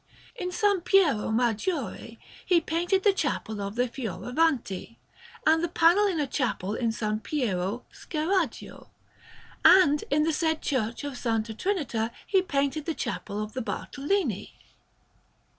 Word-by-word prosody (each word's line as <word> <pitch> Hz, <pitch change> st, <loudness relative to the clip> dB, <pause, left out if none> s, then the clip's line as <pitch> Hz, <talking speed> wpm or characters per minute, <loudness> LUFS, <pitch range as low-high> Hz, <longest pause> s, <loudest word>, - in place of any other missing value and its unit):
In 395 Hz, -7 st, -4 dB
S. 360 Hz, -, -6 dB, 0.2 s
Piero 350 Hz, -, +3 dB
Maggiore 235 Hz, -, -1 dB, 0.3 s
he 355 Hz, -2 st, +4 dB
painted 350 Hz, +4 st, 0 dB
the 410 Hz, -, +5 dB
Chapel 220 Hz, -, -2 dB
of 200 Hz, +1 st, -4 dB
the 245 Hz, +1 st, +1 dB
Fioravanti, 240 Hz, -, -1 dB, 0.5 s
and 320 Hz, +1 st, +4 dB
the -, -, +2 dB
panel 345 Hz, +5 st, +4 dB
in 360 Hz, -5 st, -1 dB
a 295 Hz, -, +1 dB
chapel 245 Hz, -7 st, -2 dB
in 235 Hz, +1 st, -1 dB
S. 225 Hz, 0 st, -3 dB, 0.2 s
Piero 220 Hz, -6 st, -2 dB
Scheraggio; 330 Hz, -, -2 dB, 0.7 s
and 300 Hz, -6 st, +6 dB
in 300 Hz, +2 st, +3 dB
the 320 Hz, +1 st, +1 dB
said 320 Hz, 0 st, 0 dB
Church 235 Hz, -2 st, -1 dB
of 285 Hz, -, -3 dB
S. 250 Hz, -, -9 dB, 0.3 s
Trinita 240 Hz, -, -1 dB, 0.2 s
he 385 Hz, -2 st, +3 dB
painted 285 Hz, -3 st, -1 dB
the 325 Hz, -, -1 dB
Chapel 210 Hz, -4 st, -3 dB
of 215 Hz, -, -8 dB
the 260 Hz, -, -3 dB
Bartolini. 280 Hz, -, -2 dB
285 Hz, 140 wpm, -27 LUFS, 230-340 Hz, 0.7 s, and